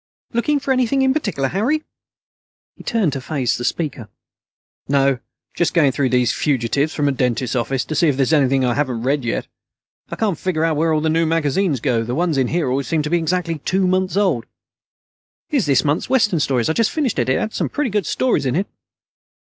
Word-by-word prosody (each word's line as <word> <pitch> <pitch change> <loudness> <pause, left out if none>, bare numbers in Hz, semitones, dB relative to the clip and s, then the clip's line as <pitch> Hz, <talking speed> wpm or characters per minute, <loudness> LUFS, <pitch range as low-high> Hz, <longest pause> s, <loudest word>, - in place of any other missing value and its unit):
"Looking 285 +5 +1
for 275 - -2
anything 260 +1 +2
in 265 0 +3
particular, 200 - -1
Harry?" 260 - 0 0.9
He - - -14
turned 205 - 0
to 135 - -4
face 130 -4 -1
the 120 - -5
speaker. 130 -6 -3 0.8
"No, 135 -2 +2 0.3
just 175 - 0
going 150 -5 +4
through 135 0 0
these 125 -2 +2
fugitives 140 +2 0
from 145 -2 0
a - - +3
dentist's 125 -1 -1
office 125 +1 -1
to - - -4
see 160 +3 +2
if 140 -3 +1
there's 135 +3 +1
anything 135 -3 +3
I 120 - +1
haven't 125 -4 -1
read 140 +1 0
yet. 115 - -2 0.6
I - - -4
can't 205 -8 -1
figure 165 -4 0
out 165 -1 +1
where 160 +2 +1
all 155 -1 +1
the 160 - 0
new 165 0 +2
magazines 160 -1 +1
go. 120 -4 +1
The 120 +2 -3
ones 165 -4 +1
in 130 - +2
here 165 +1 -1
always 130 0 -1
seem 155 +2 0
to 150 - -4
be 175 - +3
exactly 165 -1 -1
two 190 +6 0
months 185 +1 0
old." 170 - +1 1.0
"Here's 270 - +1
this 140 -3 +3
month's 145 +3 0
Western 215 -10 +2
Stories. 130 -5 +1
I 160 - +1
just 225 +5 +2
finished 275 - -1
it. 125 - 0
It 130 - +2
had 220 - -3
some - - -1
pretty 295 -6 -2
good 205 -5 -1
stories 250 - +1
in 130 - 0
it." 190 +4 +1
155 Hz, 215 wpm, -20 LUFS, 130-185 Hz, 1.0 s, going